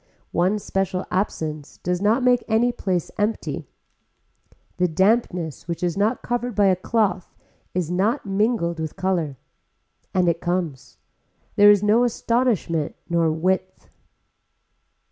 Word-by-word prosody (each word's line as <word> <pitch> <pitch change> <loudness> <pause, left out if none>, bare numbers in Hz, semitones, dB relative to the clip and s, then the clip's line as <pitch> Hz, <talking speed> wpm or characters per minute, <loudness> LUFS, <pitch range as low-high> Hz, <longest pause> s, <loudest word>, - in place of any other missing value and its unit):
One 185 +5 +2
special 195 -2 -2
absence 155 -6 -3
does 180 +1 -2
not 220 +5 +2
make 250 -1 +3
any 230 +2 +3
place 185 -7 -2
empty. 210 +2 -2 1.1
The 180 - +2
dampness 180 - 0
which 170 0 -4
is 175 -2 0
not 215 +5 0
covered 245 -1 -2
by 205 -1 +4
a 185 - +4
cloth 200 -1 -1 0.4
is 175 -2 -1
not 205 +10 0
mingled 195 -4 0
with 160 -1 -4
color. 180 -7 -1 0.7
And 185 -2 +2
it 170 0 +1
comes. 175 -6 -3 0.6
There 205 0 +7
is 205 -1 +5
no 215 +4 +4
astonishment 230 - 0
nor 170 -2 +2
width. 185 +4 -2
190 Hz, 125 wpm, -23 LUFS, 170-215 Hz, 1.1 s, There